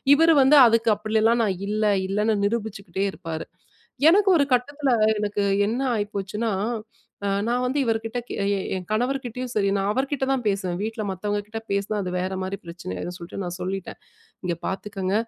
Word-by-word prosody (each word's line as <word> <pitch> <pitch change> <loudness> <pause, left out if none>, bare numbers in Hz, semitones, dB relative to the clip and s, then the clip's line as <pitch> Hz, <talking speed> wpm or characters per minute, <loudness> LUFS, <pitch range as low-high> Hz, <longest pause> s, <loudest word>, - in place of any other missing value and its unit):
இவரு 325 +2 +5
வந்து 295 +3 +6
அதுக்கு 230 0 +3
அப்பிடிலாம் 220 +2 +2
நான் 190 -3 -1
இல்ல, 215 +1 0 0.2
இல்லன்னு 210 +3 +1
நிரூபிச்சுக்கிட்டே 200 -3 -2
இருப்பாரு. 165 -1 -6 0.6
எனக்கு 390 +3 +5
ஒரு 285 - +4
கட்டத்துல 275 +3 +1 0.3
எனக்கு 205 -1 -1 0.2
என்ன 240 +5 -1
ஆயிப்போச்சுனா, 205 +1 -2 0.8
அ 200 - +1 0.2
நான் 245 +1 +1
வந்து 265 +3 0
இவருக்கிட்ட 225 +1 -1
கெ - - -4 0.4
என் 180 -1 -6
கணவர்க்கிட்டயும் 250 +1 -2
சரி, 200 -2 +2
நான் 195 +1 0
அவருக்கிட்ட 270 +3 -1
தான் 255 -3 -2
பேசுவேன், 195 -3 -1
வீட்ல 220 0 -3
மத்தவங்க 205 +2 -2
கிட்ட 225 +1 -5
பேசுனா 200 +1 0
அது 180 - -4
வேற 185 +1 -2
மாரி 190 +1 -3
பிரச்சனை 170 - -7
ஆயிடும் 175 - -5
சொல்ட்டு 175 +3 -7
நான் 175 0 -5
சொல்லிட்டேன், 190 +1 -4 0.5
இங்க 175 -1 0
பார்த்துக்கங்க, 195 -1 -3
210 Hz, 160 wpm, -24 LUFS, 195-240 Hz, 0.8 s, வந்து